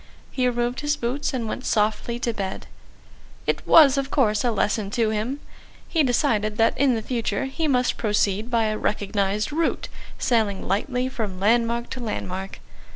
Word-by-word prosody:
He 255 -1 +1
removed 240 +1 -1
his 295 0 0
boots 250 +4 -2
and 245 -5 -3
went 255 - -4
softly 220 +2 0
to 235 - 0
bed.... 195 -3 -4 0.8
It - - 0
was, 285 -4 +7
of 275 0 -3
course, 215 -8 +2
a 245 - +2
lesson 210 -2 0
to 220 +1 +1
him. 225 +6 -2 0.5
He 325 - +1
decided 230 -6 +1
that 225 -1 +3
in 265 -2 +3
the 220 - -3
future 230 -3 -1
he 290 +4 -2
must 250 -3 +1
proceed 210 0 0
by 230 -2 +2
a 215 -1 -1
recognised 205 +2 -1
route, 325 +2 -1 0.3
sailing 220 -5 0
lightly 250 +6 0
from 215 -8 -4
landmark 235 +3 +1
to 260 - -5
landmark. 195 -4 -5
235 Hz, 165 wpm, -24 LUFS, 210-255 Hz, 0.8 s, was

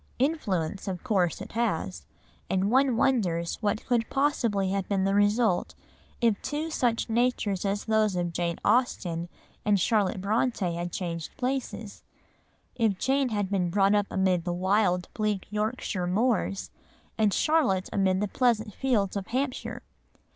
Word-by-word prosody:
Influence 205 - -1
of 185 -2 -4
course 190 -9 +1
it - - -8
has, 160 - -2 0.4
and 190 +2 +1
one 260 -2 +3
wonders 180 -11 +1
what 210 0 -1
could 235 -3 +1
possibly 235 -9 +1
have 195 -1 -2
been 195 -2 +1
the 195 0 +1
result 205 -1 +2 0.4
if 230 -4 +2
two 310 +2 -3
such 240 -6 0
natures 225 -5 0
as 200 +1 -1
those 220 -3 +2
of 175 -1 -1
Jane 170 0 -1
Austen 180 -7 +1 0.3
and 205 -4 +3
Charlotte 205 -1 +1
Brontë 205 -2 0
had 175 +1 -4
changed 170 -3 -5
places; 250 -5 -3 0.7
if 220 -5 +1
Jane 270 +4 +1
had 205 -3 -2
been 180 -3 +1
brought 195 +2 +3
up 205 -1 +2
amid 185 -2 +1
the 175 0 -2
wild, 180 0 +1
bleak 210 -3 -1
Yorkshire 210 -3 -2
moors, 205 0 0 0.4
and 215 -2 +2
Charlotte 260 - +2
amid 190 -1 +2
the 210 - +1
pleasant 225 -2 +1
fields 215 -7 0
of 195 -2 -3
Hampshire. 255 +1 -3
205 Hz, 145 wpm, -27 LUFS, 185-235 Hz, 0.7 s, one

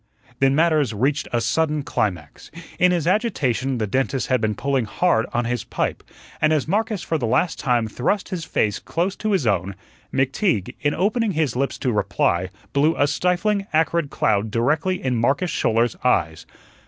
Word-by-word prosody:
Then 135 0 +3
matters 155 -7 +2
reached 140 +7 0
a 120 - +1
sudden 150 +6 0
climax. 90 - -3 0.3
In 180 0 +5
his 175 -4 0
agitation 135 - 0
the 110 - -1
dentist 130 +5 -1
had 130 -3 +2
been 110 -1 0
pulling 135 -1 0
hard 115 - +1
on 120 0 0
his 120 -1 -2
pipe, - - -2 0.4
and 155 - +3
as 155 -3 +1
Marcus 215 +1 -1
for 160 - -1
the 120 - -1
last 135 +9 +1
time 120 -4 +1
thrust 130 - -1
his 180 -3 -4
face 105 -9 0
close 180 +4 -2
to 215 - -2
his 185 -9 +1
own, 100 -2 0 0.4
McTeague, 135 - 0
in 145 0 +1
opening 210 +3 +1
his 155 -7 0
lips 135 +2 -1
to 125 - -1
reply, 95 -3 0 0.2
blew 150 +4 +3
a 145 - +4
stifling, 190 +6 0
acrid 160 -1 +1
cloud 105 -3 0
directly 150 - 0
in 130 -2 0
Marcus 145 +8 +1
Schouler's 115 +1 +1
eyes. 80 -10 +1
135 Hz, 175 wpm, -22 LUFS, 115-170 Hz, 0.4 s, In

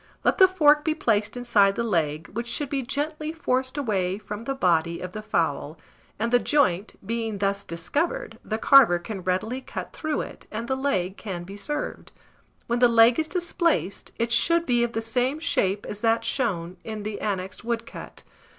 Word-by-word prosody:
Let - - +2
the 375 - +9
fork 300 -5 +4
be 315 -1 0
placed 215 -5 0
inside 205 -5 +3
the 235 - -1
leg, 160 -7 -1
which 235 +2 -3
should 270 +4 -3
be 275 -1 0
gently 305 +4 -3
forced 260 -4 -1
away 195 -8 0
from 210 +1 -7
the 275 - -2
body 170 -6 +1
of 180 - -6
the 215 - -6
fowl; 215 - -1 0.4
and 235 +1 -2
the 245 - +6
joint, 205 -9 +1
being 225 -1 -2
thus 200 0 -1
discovered, 315 - -3
the 220 - -2
carver 250 -7 +6
can 195 +2 -6
readily 185 +8 -1
cut - - -7
through 310 -2 -2
it, - - -9
and 230 +2 -5
the 265 - 0
leg 195 -9 -1
can 185 -5 -5
be 195 +3 -9
served. 295 +9 -5 0.5
When 235 +1 -1
the 245 - +7
leg 230 +2 +5
is 315 - 0
displaced, 340 - -1
it 230 0 -1
should 335 +7 +3
be 240 -3 +2
of 235 -1 -2
the 225 - -2
same 250 +5 0
shape 200 - 0
as 210 - -6
that 230 0 +2
shown 185 -9 -1
in 215 -2 -6
the 210 0 -5
annexed 190 -1 -3
woodcut. 230 0 -5
230 Hz, 185 wpm, -25 LUFS, 200-275 Hz, 0.5 s, the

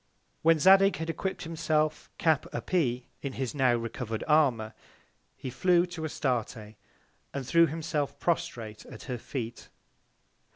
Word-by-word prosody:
When 165 0 +5
Zadig 195 +4 +6
had 160 +1 -4
equipp'd 190 +3 -4
himself 155 -2 -1
Cap 160 -3 +2
a - - -3
pee, 125 -9 0 0.2
in 140 -2 -4
his 130 -2 -3
now 130 -4 +3
recover'd 115 -1 -4
Armour, 130 -8 +3 0.6
he 130 - -6
flew 175 +4 +3
to 175 -2 -7
Astarte, 120 -7 -2 0.6
and 135 -2 -3
threw 170 +5 +5
himself 150 -3 -3
prostrate 115 -10 -2
at - - -10
her 125 -3 -4
Feet. 120 -2 -6
145 Hz, 135 wpm, -29 LUFS, 125-165 Hz, 0.6 s, Zadig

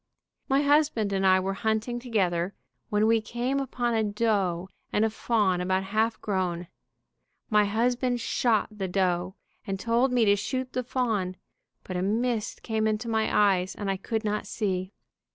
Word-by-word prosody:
My 270 +2 +3
husband 285 -8 +2
and 195 0 +2
I 185 0 +6
were 190 +1 -1
hunting 220 +4 -1
together, 195 -7 0 0.3
when 210 +1 +2
we 225 0 +4
came 245 +5 -2
upon 245 -3 -1
a 220 -1 +2
doe 205 -5 0 0.2
and 210 - +2
a 220 - 0
fawn 210 -5 +1
about 185 +1 0
half 220 +4 0
grown. 180 -4 -1 0.8
My 210 -1 +5
husband 245 +4 +1
shot 230 -2 +1
the 195 -2 -3
doe, 180 0 0 0.3
and 195 -1 -2
told 235 +5 +2
me 245 -2 +3
to 205 -1 +5
shoot 255 +5 -3
the 255 - 0
fawn, 225 -7 -1 0.5
but 185 - -4
a - - -1
mist 225 +3 -1
came 220 -1 0
into 215 +2 -1
my 220 -1 +1
eyes 190 -2 +3
and 200 -2 -2
I 195 - -2
could 220 +3 -3
not 210 0 -1
see. 185 -2 -2
215 Hz, 170 wpm, -27 LUFS, 190-235 Hz, 0.8 s, I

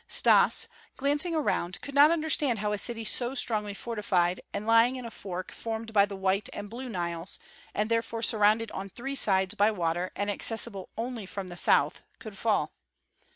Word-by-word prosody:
Stas, - - +4 0.3
gazing 290 +5 +1
around, 180 - -1
could 280 - -7
not 285 +2 +7
understand 310 -6 +1
how 210 0 -2
a 205 - 0
city 225 0 -3
so 245 +4 0
strongly 210 -5 +1
fortified, 190 -6 -1
and 210 - -4
lying 230 +3 +4
in 250 -2 -7
a 230 - -7
fork 185 -3 -7
formed 225 0 -6
by 200 -1 +5
the 200 - -7
White 190 +1 0
and 205 0 -7
Blue 250 +2 -7
Niles, 170 -3 -3 0.4
and 210 +1 0
therefore 230 0 -2
surrounded 220 0 +4
on 195 +1 -6
three 270 +7 -6
sides 190 -6 +3
by 205 +2 +3
water 175 -3 -2
and 205 0 -1
accessible 210 -2 0
only 230 -3 -5
from 195 -1 -6
the 175 - -8
south, - - +3 0.2
could - - -10
fall. - - 0
215 Hz, 180 wpm, -28 LUFS, 195-240 Hz, 0.4 s, not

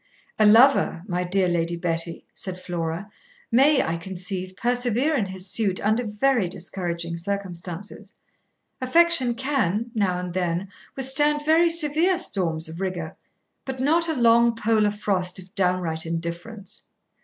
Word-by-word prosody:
'A 215 - +6
lover, 230 -5 +5
my 180 -2 -1
dear 185 +1 +1
Lady 170 -1 0
Betty,' 170 0 -3
said 185 -2 -6
Flora, 175 +1 -4 0.4
'may, 270 +4 +5
I 165 +1 -2
conceive, 185 +1 -5
persevere 245 +4 +1
in 215 -8 0
his 190 0 -4
suit 195 -1 0
under 220 +3 0
very 210 -1 +1
discouraging 170 -2 -4
circumstances. 180 0 -5 0.7
Affection 265 -3 +3
can 240 -4 -1
(now 195 -6 +1
and 180 -1 -5
then) 180 +1 -1 0.3
withstand 295 +3 +1
very 325 +2 +4
severe 335 +3 +3
storms 170 - -2
of 165 +3 -8
rigour, 180 -3 -4 0.5
but 265 -1 -6
not 325 +5 +2
a 320 - 0
long 235 -1 +4
polar 220 -2 +2
frost 195 -3 -1
of 185 +1 -10
downright 180 -5 0
indifference. 170 +6 -5
195 Hz, 135 wpm, -24 LUFS, 175-250 Hz, 0.7 s, A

